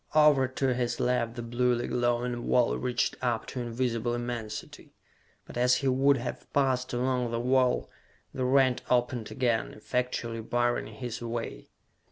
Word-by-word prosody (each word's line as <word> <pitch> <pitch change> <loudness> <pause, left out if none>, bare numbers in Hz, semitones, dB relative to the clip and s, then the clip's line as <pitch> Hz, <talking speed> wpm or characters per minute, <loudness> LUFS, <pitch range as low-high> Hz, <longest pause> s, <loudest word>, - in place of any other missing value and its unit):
Over 150 -4 +6
to 130 0 0
his 120 -1 -1
left 120 -2 0
the 120 - -5
bluely 120 +1 +1
glowing 120 0 0
wall 125 -2 +3
reached 125 -1 0
up 120 -3 0
to 125 - -4
invisible 120 0 -1
immensity. 120 -3 -6 0.5
But - - -9
as 125 +1 +4
he 135 - -1
would 135 +2 +4
have 120 0 -6
passed 130 -2 +1
along 125 0 0
the 115 0 -2
wall, 125 +1 +2 0.5
the 130 - -2
rent 130 -1 +3
opened 120 -2 +1
again, 120 -3 0
effectually 115 0 -2
barring 120 +1 0
his 120 -3 -6
way. 115 - -5
125 Hz, 150 wpm, -29 LUFS, 120-130 Hz, 0.5 s, Over